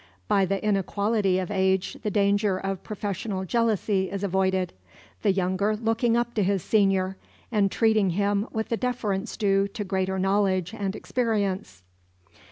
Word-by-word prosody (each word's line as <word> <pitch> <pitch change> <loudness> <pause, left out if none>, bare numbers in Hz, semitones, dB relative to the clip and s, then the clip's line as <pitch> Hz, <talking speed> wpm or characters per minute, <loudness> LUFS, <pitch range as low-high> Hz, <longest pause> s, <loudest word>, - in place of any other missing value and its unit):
By 195 -1 +3
the 195 +1 -1
inequality 200 0 +1
of 185 +1 -3
age 190 -1 +1
the 210 - -1
danger 200 -1 +2
of 195 0 -3
professional 200 -1 -4
jealousy 210 -3 +1
is 200 0 -4
avoided; 190 -1 0 0.5
the 205 - +3
younger 190 +3 0
looking 225 +1 +1
up 240 0 -1
to 210 - +1
his 195 -1 0
senior, 195 -3 +2 0.3
and 205 -4 +2
treating 220 -4 +3
him 200 +3 0
with 220 0 -3
the 230 - 0
deference 230 -4 -2
due 195 -2 +2
to 205 +1 -5
greater 190 -1 -1
knowledge 190 -1 +1
and 200 -2 -3
experience. 200 - -2
200 Hz, 150 wpm, -26 LUFS, 190-215 Hz, 0.5 s, By